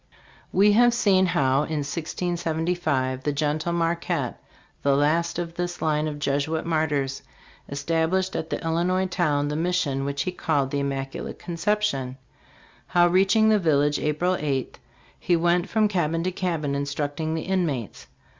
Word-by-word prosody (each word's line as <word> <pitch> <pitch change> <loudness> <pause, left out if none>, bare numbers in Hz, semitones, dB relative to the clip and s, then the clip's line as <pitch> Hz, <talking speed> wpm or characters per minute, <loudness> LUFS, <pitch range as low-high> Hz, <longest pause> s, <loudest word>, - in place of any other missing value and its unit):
We 205 +2 +5
have 240 +3 +5
seen 190 -5 +3
how, 140 -7 +2
in 150 0 -1
1675, 160 -4 -1
the 145 - -1
gentle 150 +3 -1
Marquette, 170 0 -1 0.4
the 140 -1 +3
last 165 +4 +1
of 170 -1 -4
this 175 0 -4
line 155 0 0
of 150 -1 -4
Jesuit 145 +3 -1
martyrs, 145 -5 0 0.5
established 165 +6 0
at 160 - -3
the - - -2
Illinois 175 +3 +1
town 150 -6 0
the 150 - -2
mission 160 -5 0
which 140 0 -2
he 185 - -2
called 145 -6 0
the 145 - 0
"Immaculate 135 -1 -4
Conception"; 170 -8 -1 0.7
how, 175 -1 +4
reaching 195 +5 +4
the 215 -1 +4
village, 145 -4 +2
April 165 +5 0
8, 135 -3 -2 0.4
he 175 - +2
went 175 +2 +1
from 220 -1 +3
cabin 165 -4 0
to 185 - -1
cabin 165 -6 -2
instructing 145 +3 -2
the 160 - -3
inmates. 165 - -2
160 Hz, 145 wpm, -25 LUFS, 145-180 Hz, 0.7 s, We